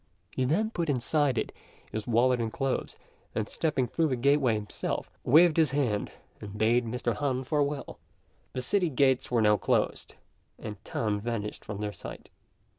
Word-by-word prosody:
He 130 - -1
then 210 - +1
put 170 -7 -2
inside 140 0 +1
it - - -1 0.4
his 110 -1 -4
wallet 120 +1 +3
and 115 -1 -2
clothes, 135 +1 -2 0.4
and 110 - -1
stepping 145 -6 0
through 160 +6 +1
the 130 - 0
gateway 135 -1 +3
himself, 105 -1 -4
waved 160 +4 +6
his 160 -3 +4
hand 130 -7 0 0.3
and 105 0 -8
bade 115 +3 +3
Mr. 120 0 -1
Han 130 -1 -1
farewell. 145 +1 -1 0.5
The 130 - -3
city 185 +4 +2
gates 130 -2 +2
were 120 -3 +2
now 105 0 +5
closed, - - 0 0.4
and 105 -2 -8
Tan 105 -2 -1
vanished 105 -1 -4
from 105 -1 -6
their 105 -1 -3
sight. - - -10
125 Hz, 165 wpm, -29 LUFS, 110-145 Hz, 0.5 s, waved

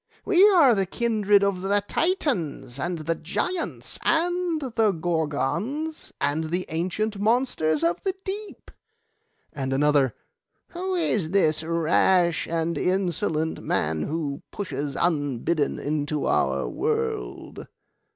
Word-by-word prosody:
We 395 +1 +6
are 325 - +6
the 195 -3 0
kindred 210 -2 +2
of 200 -2 0
the 200 +1 +1
Titans, 195 - -1
and 175 +4 -2
the 165 - +1
Giants, 325 - -3
and 345 0 +1
the 230 -6 +1
Gorgons, 175 - -2
and 155 +3 0
the 175 +3 -2
ancient 185 +6 -2
monsters 210 - +1
of 170 +1 +1
the 385 -1 -1
deep.' 405 +2 -6 0.8
And 135 -2 -3
another, 140 -1 +2 0.5
'Who 370 +2 -3
is 220 - 0
this 160 -5 +2
rash 170 +1 +2
and 165 0 -1
insolent 180 -3 0
man 80 +1 0
who 145 - -3
pushes 145 -7 -4
unbidden 145 -2 0
into 150 0 -2
our - - +1
world? 450 -1 -3
180 Hz, 115 wpm, -25 LUFS, 155-260 Hz, 0.8 s, We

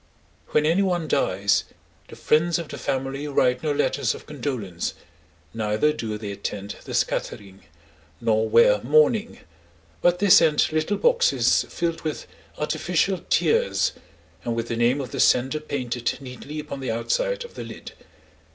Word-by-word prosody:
When 150 - +1
any 165 +5 +3
one 175 -4 0
dies, 100 -8 +1 0.4
the - - -11
friends 165 +3 +2
of 170 -3 -6
the - - -7
family 135 +2 -3
write 125 -3 +2
no 155 - -1
letters 145 - 0
of - - -12
condolence, 120 - -4 0.6
neither 110 +7 +1
do 110 -7 -4
they 105 -1 -6
attend 100 0 -5
the - - -5
scattering, 95 -3 -3 0.5
nor 110 0 +1
wear 105 -2 +5
mourning, 155 - +2 0.6
but 175 0 +3
they 200 0 +2
send 155 -3 +5
little 155 +6 0
boxes 485 0 +3
filled 170 -1 -2
with 155 - -4 0.3
artificial - - 0
tears, 470 +2 +2 0.5
and 120 -1 -2
with 115 0 -3
the 115 - -1
name 120 +4 +2
of 130 - -7
the - - -5
sender 130 +5 +3
painted 125 -5 -3
neatly 140 +3 -8
upon 150 -2 -6
the 130 - -4
outside - - -1
of 475 - -13
the - - -7
lid. - - -9
140 Hz, 150 wpm, -24 LUFS, 115-160 Hz, 0.6 s, wear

